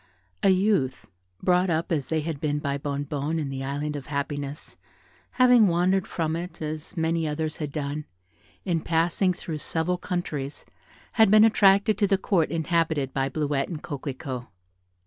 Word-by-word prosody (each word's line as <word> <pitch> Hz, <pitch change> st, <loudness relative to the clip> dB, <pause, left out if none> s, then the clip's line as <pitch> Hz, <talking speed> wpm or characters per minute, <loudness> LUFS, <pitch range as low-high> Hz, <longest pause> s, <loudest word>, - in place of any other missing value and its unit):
A 195 Hz, -, +4 dB
youth, 185 Hz, -8 st, +2 dB, 0.4 s
brought 180 Hz, +1 st, +3 dB
up, 165 Hz, +1 st, -1 dB
as 150 Hz, -5 st, 0 dB
they 160 Hz, -1 st, 0 dB
had 150 Hz, -2 st, -4 dB
been, 150 Hz, -1 st, 0 dB
by 140 Hz, -1 st, -2 dB
Bonnebonne, 145 Hz, +2 st, -2 dB
in 150 Hz, -3 st, -2 dB
the 135 Hz, 0 st, -4 dB
Island 145 Hz, +2 st, -3 dB
of 140 Hz, -2 st, -6 dB
Happiness, 145 Hz, 0 st, -4 dB, 0.6 s
having 250 Hz, -4 st, +6 dB
wandered 180 Hz, +2 st, +2 dB
from 160 Hz, -1 st, -2 dB
it, 175 Hz, +2 st, -6 dB
as 155 Hz, +3 st, -5 dB
many 165 Hz, 0 st, 0 dB
others 155 Hz, +1 st, -3 dB
had 150 Hz, -2 st, -4 dB
done, 145 Hz, 0 st, -3 dB, 0.6 s
in 175 Hz, -4 st, +1 dB
passing 170 Hz, +4 st, +2 dB
through 165 Hz, -3 st, -5 dB
several 170 Hz, +4 st, -1 dB
countries, 150 Hz, -7 st, -4 dB, 0.5 s
had 220 Hz, -3 st, +5 dB
been 215 Hz, +1 st, +7 dB
attracted 205 Hz, -1 st, +4 dB
to 205 Hz, -, +3 dB
the 195 Hz, -, +3 dB
Court 185 Hz, -4 st, +1 dB
inhabited 160 Hz, -4 st, 0 dB
by 135 Hz, 0 st, 0 dB
Bleuette 145 Hz, -2 st, -1 dB
and 160 Hz, -4 st, -6 dB
Coquelicot. 130 Hz, -3 st, -5 dB
160 Hz, 160 wpm, -26 LUFS, 145-180 Hz, 0.6 s, been